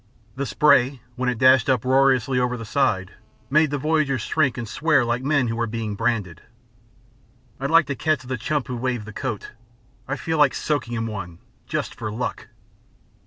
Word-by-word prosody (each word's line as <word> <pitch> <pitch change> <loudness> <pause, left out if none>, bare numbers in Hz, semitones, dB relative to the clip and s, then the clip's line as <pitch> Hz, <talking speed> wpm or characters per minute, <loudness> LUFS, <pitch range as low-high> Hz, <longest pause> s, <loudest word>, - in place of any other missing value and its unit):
The 140 0 -3
spray, 140 -3 +3 0.2
when 125 0 -1
it 125 - -2
dashed 130 -1 +5
uproariously 130 0 +3
over 125 0 0
the 115 - -7
side, 105 -8 0 0.4
made 155 +1 +4
the 145 - -1
voyagers 145 -4 0
shrink 140 -6 +1
and 120 -2 -4
swear 150 +2 +2
like 120 +1 -1
men 140 -3 +2
who 115 - -2
were 115 0 -1
being 110 -1 -4
branded. 105 -6 -2 1.2
"I'd 140 +1 -2
like 165 0 +5
to 140 0 -3
catch 155 -1 0
the 130 0 -3
chump 145 +3 -2
who 125 - -5
waved 120 -3 -2
the 110 - -9
coat. 115 -3 -4 0.6
I 135 - -2
feel 160 +1 -2
like 150 - +4
soaking 130 -6 -2
him 115 0 -2
one, 100 -6 -6 0.3
just - - -3
for 110 -2 -5
luck." 125 +3 -4
130 Hz, 180 wpm, -23 LUFS, 115-140 Hz, 1.2 s, dashed